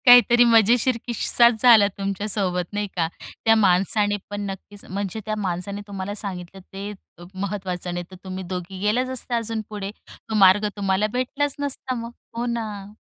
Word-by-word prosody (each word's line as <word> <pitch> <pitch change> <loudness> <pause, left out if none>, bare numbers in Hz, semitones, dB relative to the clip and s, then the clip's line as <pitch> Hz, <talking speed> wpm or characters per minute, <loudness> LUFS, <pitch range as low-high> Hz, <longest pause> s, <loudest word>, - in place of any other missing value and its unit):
काहीतरी 245 -1 +8
मजेशीर 235 +2 +4
किस्साच 235 -1 +3
झाला 225 -5 +8
तुमच्या 200 +1 -3
सोबत 180 -3 0
नाही 205 0 -1
का? 165 -2 +1 0.4
त्या 225 0 +6
माणसाने 205 +1 +3
पण 205 0 -4
नक्कीच 200 +1 -9
म्हणजे 200 +2 -4
त्या 215 -1 -2
माणसाने 200 +1 -3
तुम्हाला 200 0 -5
सांगितलं 190 -2 -5
ते 200 +2 -5 0.5
महत्वाचं 185 -3 -3
नाही 175 0 -4
तर - - -10
तुम्ही 190 0 -6
दोघी 180 +1 -6
गेलाच 225 +6 +1
असता 255 -1 -2
अजून 225 -1 -2
पुढे, 205 -2 -5 0.2
तो 220 - -8
मार्ग 200 +1 +6
तुम्हाला 195 +1 +1
भेटलाच 275 +3 -1
नसता 275 -2 -2
मग. 235 0 -6 0.2
हो 235 +1 -2
ना? 215 -4 -4
205 Hz, 160 wpm, -23 LUFS, 190-230 Hz, 0.5 s, काहीतरी